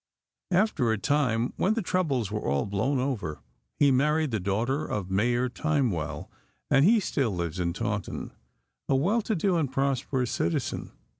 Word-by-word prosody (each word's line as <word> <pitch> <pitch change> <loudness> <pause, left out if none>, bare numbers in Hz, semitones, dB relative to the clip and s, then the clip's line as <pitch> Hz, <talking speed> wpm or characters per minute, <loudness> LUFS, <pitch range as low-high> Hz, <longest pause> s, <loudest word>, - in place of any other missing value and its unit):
After 185 - +2
a 110 - +1
time, 125 -2 +1
when 210 +4 +2
the 225 - -1
troubles 140 - 0
were 105 0 -2
all 70 +1 0
blown 105 +8 0
over, 120 - -3 0.3
he 140 -1 +5
married 150 +3 +2
the 110 - 0
daughter 115 +10 0
of 95 -3 -4
Mayor 120 +6 +2
Timewell, 125 - -1 0.4
and 135 - +5
he 220 +7 +6
still 140 - 0
lives 85 -2 -3
in 85 -1 0
Taunton, 100 +1 -3 0.6
a 135 - +4
well 195 - +2
to 220 0 -1
do 180 0 +1
and 145 -5 0
prosperous 135 -2 0
citizen. 85 +1 -2
130 Hz, 160 wpm, -27 LUFS, 105-150 Hz, 0.6 s, he